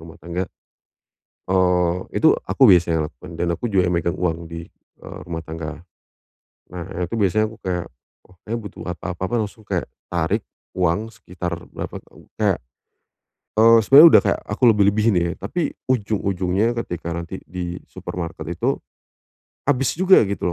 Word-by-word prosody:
rumah 80 0 -12
tangga. 85 +3 -4 1.1
Eee, 90 -1 +2 0.2
itu - - +7 0.2
aku 95 +8 +2
biasanya 85 -4 +3
lakukan 90 0 -13
dan 85 +1 -1
aku - - -5
juga 90 -2 +3
yang 90 - +1
megang 85 0 -1
uang 85 -1 -1
di, 85 0 -8 0.3
eee, - - -9
rumah 85 -1 -5
tangga. 80 0 -7 0.9
Nah 90 -2 -6
ya - - -4
itu 115 - -2
biasanya 110 +2 +2
aku 110 - -13
kayak, 90 -4 -3 0.4
oh 90 - -22
kayaknya 115 +2 -2
butuh 105 - -9
apa 90 -1 -6
apa - - -8
apa, 120 - -4
langsung 105 +1 -8
kayak - - -2 0.2
tarik 85 -2 -1 0.3
uang 90 +6 +1
sekitar 90 -4 -6 0.2
berapa - - -5
tahu - - -19 0.2
kayak - - +2 1.0
eee, 115 +1 +7
sebenernya 140 +9 +9
udah - - +8
kayak - - 0
aku - - -5
lebih-lebihin 105 0 +3
ya, 85 0 +1
tapi 155 - -2 0.2
ujung-ujungnya 100 -1 0
ketika 85 -1 -5
nanti 85 +2 -5
di 90 0 -5
supermarket 85 -2 -6
itu, 85 - 0 0.9
habis 135 -1 +1
juga 190 +1 +6
gitu 100 -3 -3
90 Hz, 160 wpm, -22 LUFS, 85-105 Hz, 1.1 s, sebenernya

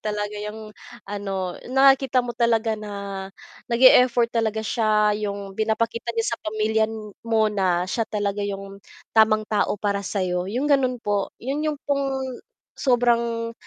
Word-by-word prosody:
talaga 210 -1 -3
yung 215 0 -7 0.3
ano, 195 -3 -4
nakikita 265 -1 +4
mo 240 - -4
talaga 230 -1 +1
na 210 -1 -6 0.8
nag-e-effort 240 -1 +5
talaga 220 -1 -1
siya. 215 -2 +2 0.2
Yung 200 -1 -6
pinapakita 225 +3 -1
niya 230 0 0
sa - - -59
pamilya 220 +1 0 0.4
mo 220 -1 +3
na 185 -3 +1
siya 225 +5 -1
talaga 205 -1 -2
yung 195 -1 -5 0.3
tamang 215 -1 +4
tao 210 0 0
para 200 0 -1
sa'yo, 185 -2 -2
yung 245 +7 -2
gano'n 265 -3 +2
po. 205 -1 0
'Yon 275 +5 -3
yung 295 -2 -3
pong 275 -1 0 0.6
sobrang, 235 -2 +1
220 Hz, 135 wpm, -23 LUFS, 205-235 Hz, 0.8 s, nag-e-effort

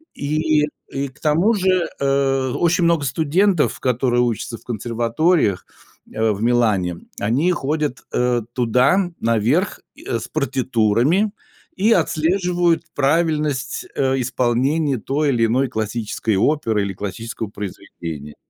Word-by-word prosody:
И 155 +1 +1 0.2
и 140 +1 -3
к 130 - -18
тому 165 +9 +2
же, 185 -3 +1
э, 135 -1 +1
очень 175 +1 +2
много 170 -3 +3
студентов, 160 +6 +1
которые 125 -1 +1
учатся 115 -1 -2
в - - -24
консерваториях, 115 - 0 0.5
э, 110 0 +1
в 105 +1 -3
Милане, 110 -8 +2 0.2
они 130 - +1
ходят, 150 -4 -2
э, 125 -1 +1
туда, 130 - +2
наверх, 115 - +1 0.2
и, - - -15
э, - - -2
с 115 - -7
партитурами, 135 - +1 0.4
и 210 +4 +2
отслеживают 175 0 +1
правильность, 150 -2 0
э, 135 -1 +1
исполнения 130 +4 +1
той 145 +6 0
или 120 -4 +2
иной 130 +4 +1
классической 110 -1 -2
оперы 115 -4 +1
или 100 -1 -3
классического 105 +4 -5
произведения. 85 -7 -7
135 Hz, 125 wpm, -20 LUFS, 115-155 Hz, 0.5 s, много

